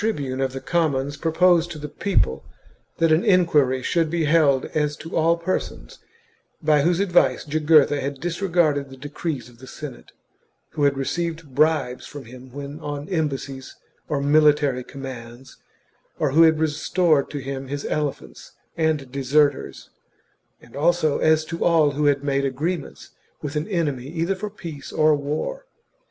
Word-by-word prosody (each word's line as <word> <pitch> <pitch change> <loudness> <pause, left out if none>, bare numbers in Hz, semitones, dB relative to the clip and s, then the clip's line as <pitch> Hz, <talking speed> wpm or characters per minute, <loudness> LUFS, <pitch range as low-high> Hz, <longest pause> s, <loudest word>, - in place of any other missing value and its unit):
^ 220 +1 +1
bune 135 -2 -4
of 135 -1 0
the 135 - -5
commons, 145 -4 0
proposed 170 +2 +3
to 170 - -7
the 150 0 -6
people 150 - 0 0.5
that 165 -1 +3
an 155 +3 +4
enquiry 150 -9 +3
should 165 +2 +1
be 170 0 0
held 150 -4 +3
as 150 -1 0
to 165 - -8
all 165 +1 +3
persons 170 +2 -4 0.6
by 150 -2 +3
whose 170 +4 +2
advice 175 -10 +2
Jugurtha 150 -1 +3
had 140 0 -4
disregarded 170 -5 0
the 135 - -12
decrees 145 -2 -5
of 120 -1 -18
the 130 - -12
Senate, - - -9 0.6
who 150 -2 0
had 140 -1 +2
received 165 +1 -3
bribes 150 -3 +1
from 145 -3 -9
him 125 +2 -13
when 140 +2 -7
on 145 -2 -5
embassies 140 -6 -3 0.3
or 145 -3 0
military 145 -3 +3
commands, 130 -2 -10 0.6
or 150 - 0
who 160 +4 +5
had 160 -1 +6
restored 155 0 +1
to 145 - -5
him 135 0 -5
his 140 +1 -5
elephants 145 - -4 0.2
and 155 -5 0
deserters, 140 - 0 0.7
and 120 - -17
also 155 0 +2
as 155 0 +3
to 165 +1 -4
all 160 -4 +4
who 145 +1 -1
had 140 -1 +2
made 140 -1 0
agreements 150 +5 -3 0.3
with 145 0 -4
an 150 +1 -1
enemy 150 - -2
either 165 +4 -1
for 200 +2 -5
peace 165 -9 -9
or 155 -1 +4
war. 155 - -4
150 Hz, 160 wpm, -23 LUFS, 135-165 Hz, 0.7 s, had